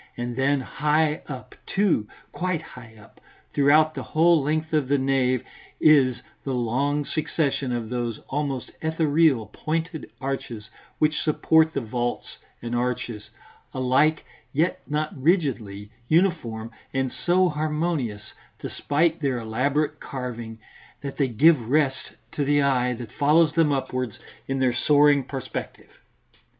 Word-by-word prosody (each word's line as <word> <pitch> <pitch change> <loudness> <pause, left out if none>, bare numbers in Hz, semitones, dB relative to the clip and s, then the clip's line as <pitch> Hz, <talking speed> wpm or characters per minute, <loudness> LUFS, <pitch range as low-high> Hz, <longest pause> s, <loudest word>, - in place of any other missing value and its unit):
And 120 0 -4
then 135 +1 +2
high 150 +3 0
up, 130 -3 -8
too, 190 - +1 0.2
quite 180 -3 -2
high 115 -6 -13
up, 105 - -19 0.3
throughout 155 +2 +4
the - - -5
whole 165 0 +3
length 155 +3 -1
of 150 -4 +2
the 140 +1 +2
nave, 130 -2 +1 0.4
is 130 -5 +4 0.2
the 135 -2 -2
long 140 +5 0
succession 145 -4 -1
of 120 -2 -3
those 120 -3 -2
almost 140 -3 -3
ethereal 160 -5 +2
pointed 160 +1 -3
arches 125 -5 -5 0.3
which 155 0 +1
support 160 +1 +3
the 140 - 0
vaults 120 +1 -4 0.2
and 120 0 -3
arches, 120 -3 -3 0.5
alike, 135 +5 +2 0.3
yet 160 +5 0
not 150 +4 -2
rigidly 130 - 0 0.2
uniform, 155 -10 +1 0.2
and 130 -1 0
so 180 +1 +2
harmonious, 150 -8 -2 0.3
despite 160 +3 0
their 135 -4 0
elaborate 130 +7 -1
carving, 120 -4 -6 0.4
that 140 -1 -6
they 140 - +2
give 130 0 +4
rest 140 -2 +1 0.2
to 145 - -1
the 145 +1 +3
eye 125 -2 +2
that 120 -2 -8
follows 155 +2 +3
them 160 -2 +3
upwards 130 -4 -2 0.3
in 135 - -1
their 130 -2 +2
soaring 145 +1 +4
perspective. 135 -1 -7
140 Hz, 130 wpm, -24 LUFS, 125-155 Hz, 0.5 s, throughout